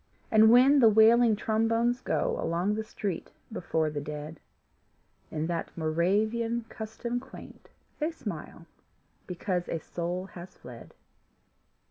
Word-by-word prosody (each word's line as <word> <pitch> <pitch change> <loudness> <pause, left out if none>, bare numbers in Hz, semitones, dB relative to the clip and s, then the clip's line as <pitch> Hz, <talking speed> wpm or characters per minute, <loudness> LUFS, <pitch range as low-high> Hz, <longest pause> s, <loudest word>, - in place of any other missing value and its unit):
And 220 0 +6
when 260 +5 +6
the 230 -4 +7
wailing 220 +1 +5
trombones 230 +3 0
go - - -1
Along 175 +5 0
the 220 +1 -2
street 200 -4 -5 0.2
before 160 -6 -1
the 145 -1 -4
dead 150 +1 -7 0.9
In 155 0 -3
that 170 0 -3
Moravian 215 +9 0
custom 235 +2 -5
quaint, 265 +1 -13 0.3
They 305 +1 0
smile 200 - -8 0.6
because 180 0 -3
a - - -1
soul 175 +3 -4
has 180 +1 -11
fled. 120 -2 -12
210 Hz, 120 wpm, -28 LUFS, 170-230 Hz, 0.9 s, the